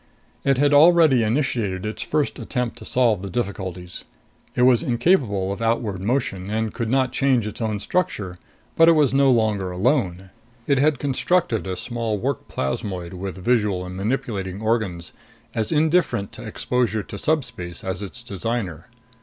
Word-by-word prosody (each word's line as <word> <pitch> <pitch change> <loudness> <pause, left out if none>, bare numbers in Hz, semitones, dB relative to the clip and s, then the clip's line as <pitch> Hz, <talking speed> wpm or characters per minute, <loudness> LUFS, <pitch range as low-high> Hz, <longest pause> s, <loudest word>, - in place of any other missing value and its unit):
It 135 -2 +2
had 145 +1 +3
already 155 -3 +6
initiated 115 -5 0
its 110 - -4
first 150 -2 -1
attempt 125 -3 -3
to - - -10
solve 120 -7 +2
the 100 - -5
difficulties. 95 -5 -4 0.5
It 125 - +3
was 125 -1 +5
incapable 120 - +1
of 100 - -5
outward 115 -4 0
motion 105 -4 -1
and 110 0 -1
could 115 -2 -3
not 130 0 +2
change 130 -5 +2
its 105 - -6
own 110 -2 -1
structure, 100 - -2 0.4
but 165 0 +6
it - - +7
was 150 -5 +3
no 135 0 +4
longer 110 -6 +2
alone. 95 - 0 0.3
It 140 -2 +2
had 145 0 +3
constructed 145 - 0
a 95 -1 -3
small 115 -3 -2
work 130 +5 -3
plasmoid 85 +6 -3
with 95 +1 -5
visual 105 -7 +1
and 90 0 -7
manipulating 100 -3 -2
organs, 110 -6 -1 0.4
as 110 -2 -2
indifferent 160 - +2
to - - -10
exposure 120 -4 -1
to 100 - -8
subspace 125 - -2
as 95 0 -3
its 105 +5 -7
designer. 100 -4 -4
115 Hz, 160 wpm, -23 LUFS, 95-135 Hz, 0.5 s, it